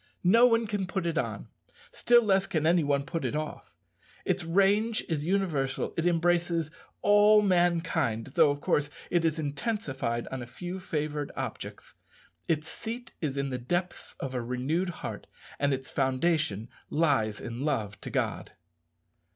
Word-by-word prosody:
No 230 Hz, +7 st, +7 dB
one 230 Hz, -1 st, +2 dB
can 205 Hz, -3 st, -2 dB
put 190 Hz, -1 st, -2 dB
it 165 Hz, -1 st, -1 dB
on; 165 Hz, -, -2 dB, 0.4 s
still 240 Hz, 0 st, +4 dB
less 195 Hz, -2 st, +2 dB
can 160 Hz, -5 st, -1 dB
any 170 Hz, 0 st, +4 dB
one 140 Hz, -1 st, +1 dB
put 165 Hz, -1 st, -3 dB
it 130 Hz, +2 st, -1 dB
off. 155 Hz, 0 st, -4 dB, 0.6 s
Its -, -, 0 dB
range 200 Hz, +6 st, +2 dB
is 155 Hz, -1 st, -2 dB
universal; 165 Hz, -9 st, 0 dB
it 165 Hz, +1 st, +1 dB
embraces 170 Hz, -1 st, +1 dB, 0.3 s
all 210 Hz, +1 st, +6 dB
mankind, 165 Hz, -, +1 dB
though, -, -, +5 dB
of 145 Hz, 0 st, -2 dB
course, 150 Hz, +1 st, +1 dB, 0.2 s
it 175 Hz, -1 st, +2 dB
is 165 Hz, -1 st, +1 dB
intensified 140 Hz, -, -2 dB
on 130 Hz, -1 st, -5 dB
a 120 Hz, -, -7 dB
few 175 Hz, +10 st, -6 dB
favoured 150 Hz, -4 st, -3 dB
objects; -, -, -6 dB, 0.5 s
its 160 Hz, -1 st, 0 dB
seat 230 Hz, +8 st, -6 dB
is 140 Hz, -4 st, -2 dB
in 140 Hz, -1 st, -1 dB
the 125 Hz, -, -2 dB
depths 175 Hz, +8 st, -3 dB
of 135 Hz, -1 st, -4 dB
a 125 Hz, -, -1 dB
renewed 130 Hz, +10 st, -1 dB, 0.2 s
heart, -, -, -6 dB, 0.3 s
and 140 Hz, 0 st, +2 dB
its 135 Hz, 0 st, -3 dB
foundation 135 Hz, -, 0 dB, 0.2 s
lies 115 Hz, -10 st, +1 dB
in 120 Hz, +2 st, -5 dB
love 110 Hz, -9 st, -2 dB
to -, -, -6 dB
God. -, -, -2 dB
160 Hz, 160 wpm, -29 LUFS, 135-185 Hz, 0.6 s, No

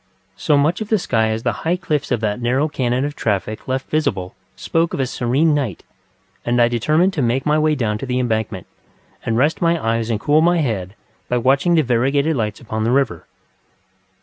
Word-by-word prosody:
So 150 Hz, -, +2 dB
much 155 Hz, +8 st, +1 dB
of 215 Hz, -, -3 dB
the 220 Hz, -, +3 dB
sky 110 Hz, -, 0 dB
as 110 Hz, +1 st, -3 dB
the -, -, +1 dB
high 165 Hz, +2 st, +1 dB
cliffs 150 Hz, -5 st, -2 dB
of 120 Hz, -3 st, 0 dB
that 105 Hz, +1 st, -2 dB
narrow 130 Hz, +5 st, +1 dB
canon 130 Hz, -2 st, -1 dB
of 145 Hz, 0 st, -4 dB
traffic 105 Hz, 0 st, -2 dB
left 130 Hz, 0 st, -2 dB
visible 95 Hz, -12 st, -1 dB, 0.2 s
spoke 165 Hz, 0 st, -1 dB
of -, -, -6 dB
a 135 Hz, -, +1 dB
serene 130 Hz, +6 st, +1 dB
night, 130 Hz, -, -2 dB, 0.6 s
and 120 Hz, +1 st, 0 dB
I 120 Hz, -, +5 dB
determined 155 Hz, -, +2 dB
to 150 Hz, -, -1 dB
make 125 Hz, +2 st, 0 dB
my 150 Hz, +1 st, +2 dB
way 155 Hz, 0 st, +2 dB
down 105 Hz, -5 st, -1 dB
to 135 Hz, -, -5 dB
the 125 Hz, 0 st, -1 dB
Embankment, 110 Hz, -6 st, -2 dB, 0.6 s
and 115 Hz, -1 st, -1 dB
rest 145 Hz, +6 st, +1 dB
my 170 Hz, -1 st, +2 dB
eyes 115 Hz, -2 st, -1 dB
and 110 Hz, -3 st, 0 dB
cool 150 Hz, +7 st, +3 dB
my 175 Hz, +2 st, +3 dB
head 105 Hz, -, -2 dB, 0.3 s
by 125 Hz, -, +1 dB
watching 135 Hz, +8 st, +2 dB
the 160 Hz, -, +4 dB
variegated 135 Hz, +5 st, +1 dB
lights 105 Hz, -4 st, -2 dB
upon 110 Hz, -2 st, -4 dB
the 115 Hz, -, +1 dB
river. 125 Hz, -9 st, 0 dB
130 Hz, 205 wpm, -19 LUFS, 115-150 Hz, 0.6 s, I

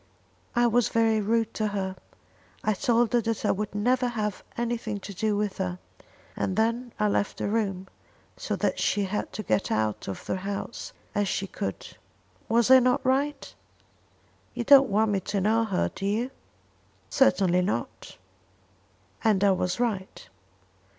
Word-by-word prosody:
"I 240 Hz, 0 st, +4 dB
was 240 Hz, -1 st, +3 dB
very 225 Hz, -1 st, +2 dB
rude 225 Hz, +2 st, 0 dB
to 215 Hz, -, -1 dB
her. 190 Hz, -2 st, -3 dB, 0.7 s
I 215 Hz, -, +2 dB
told 235 Hz, +3 st, +1 dB
her 240 Hz, -, +4 dB
that 225 Hz, 0 st, -2 dB
I -, -, +4 dB
would 210 Hz, +1 st, -3 dB
never 250 Hz, +4 st, +2 dB
have 215 Hz, -4 st, -3 dB
anything 230 Hz, -3 st, -2 dB
to 200 Hz, +1 st, -8 dB
do 210 Hz, +2 st, 0 dB
with 205 Hz, -2 st, -2 dB
her; 180 Hz, -1 st, -2 dB, 0.6 s
and 190 Hz, -, -1 dB
then 230 Hz, +2 st, 0 dB
I 210 Hz, -, +3 dB
left 205 Hz, 0 st, 0 dB
the -, -, -2 dB
room, 200 Hz, -3 st, -1 dB, 0.5 s
so -, -, -3 dB
that -, -, -1 dB
she 205 Hz, -, +1 dB
had 195 Hz, +2 st, -3 dB
to 215 Hz, -, -4 dB
get 110 Hz, -, 0 dB
out 110 Hz, -1 st, -1 dB
of 95 Hz, -, -6 dB
the -, -, -1 dB
house 200 Hz, +4 st, -5 dB, 0.2 s
as 205 Hz, -1 st, +1 dB
she 195 Hz, -, -1 dB
could. 100 Hz, -, -5 dB, 0.6 s
Was 235 Hz, +2 st, +3 dB
I 260 Hz, -, +10 dB
not 255 Hz, +1 st, +1 dB
right? 275 Hz, +3 st, 0 dB, 1.0 s
You 240 Hz, -, -2 dB
don't 275 Hz, 0 st, +7 dB
want 215 Hz, +2 st, +2 dB
me 200 Hz, -, +1 dB
to 200 Hz, +2 st, -2 dB
know 220 Hz, +4 st, +2 dB
her, 195 Hz, -4 st, 0 dB
do 195 Hz, -, -4 dB
you?" 230 Hz, +6 st, -1 dB, 0.8 s
"Certainly 190 Hz, -9 st, +3 dB
not." 185 Hz, +3 st, -4 dB, 1.1 s
"And 210 Hz, -3 st, +3 dB
I 200 Hz, -, +5 dB
was 180 Hz, +1 st, -1 dB
right." 210 Hz, -6 st, -3 dB
215 Hz, 165 wpm, -27 LUFS, 195-235 Hz, 1.1 s, I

